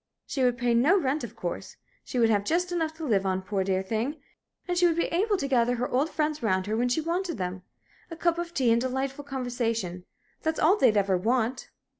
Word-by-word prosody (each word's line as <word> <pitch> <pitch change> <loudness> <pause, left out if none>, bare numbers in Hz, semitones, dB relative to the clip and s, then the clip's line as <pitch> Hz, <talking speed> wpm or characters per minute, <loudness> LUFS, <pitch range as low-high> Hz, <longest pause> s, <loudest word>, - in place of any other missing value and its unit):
She 265 - -2
would 245 -1 +2
pay 240 0 +1
no 295 +12 +4
rent, 285 -1 -1
of 235 -1 -7
course. 175 -5 -5 0.3
She - - -5
would 230 -2 +4
have 205 -2 +2
just 355 - 0
enough 320 -2 -1
to 320 0 -6
live 205 -8 +2
on, 190 -1 -1
poor, 195 0 -1
dear 190 0 0
thing! 230 +9 -2 0.5
And 355 - 0
she 350 0 +5
would 335 - +1
be 335 - +1
able 405 +4 +2
to 280 - -2
gather 245 -2 +2
her 250 +1 -1
old 275 +5 +1
friends 305 -1 -1
round 190 -4 +1
her 215 +1 -1
when 245 +2 +1
she 285 +6 +1
wanted 340 +1 -2
them. 180 -1 -4 0.5
A 330 - -6
cup 340 +1 +1
of 345 -1 -4
tea 260 -8 +2
and 230 - +2
her 260 - -1
delightful 270 +2 -3
conversation 235 -9 -3 0.4
that's 320 -1 -1
all 345 +6 +5
they'd 245 - +4
ever 195 -2 +2
want." 245 +4 0
250 Hz, 235 wpm, -27 LUFS, 220-320 Hz, 0.5 s, she